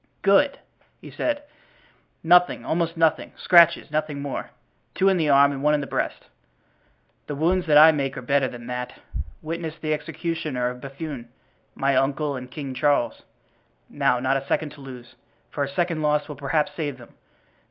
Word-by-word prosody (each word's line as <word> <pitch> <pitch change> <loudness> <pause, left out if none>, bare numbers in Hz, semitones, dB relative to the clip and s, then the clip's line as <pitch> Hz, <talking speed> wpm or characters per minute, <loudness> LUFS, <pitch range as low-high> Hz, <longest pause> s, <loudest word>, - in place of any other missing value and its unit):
"Good!" 275 +9 +4 0.4
he - - -12
said, 295 -1 -2 0.8
"nothing, 180 +2 +4
almost 165 0 -1
nothing—scratches, 170 +1 +3
nothing 155 -2 -2
more; 140 -1 -5 0.5
two 195 - +3
in 190 - +2
the 160 -3 +1
arm 140 0 +6
and 135 -1 -5
one 150 +1 +3
in - - 0
the 140 - -4
breast. - - -3 1.0
The 145 - -4
wounds 175 +4 +1
that 150 -1 +5
I 155 +2 +9
make 140 -2 -2
are 125 - -6
better 140 +1 +2
than 120 -2 -9
that—witness 155 - -6
the 155 -1 -1
executioner 155 -4 -3
of 125 0 -11
Bethune, 140 -3 -7 0.5
my 135 0 +1
uncle 140 +2 0
and 125 -1 -7
King 140 -1 -6
Charles. 140 -1 +1 0.7
Now, 135 -4 +1
not 130 +2 +1
a 135 - -6
second 155 -2 -1
to 145 - -14
lose, 125 -3 -11 0.4
for 145 - -2
a 140 - -3
second 170 +2 -1
lost 150 -1 +1
will 150 - -7
perhaps 150 +2 0
save 145 -5 -3
them. 120 - -15
145 Hz, 165 wpm, -24 LUFS, 135-160 Hz, 1.0 s, I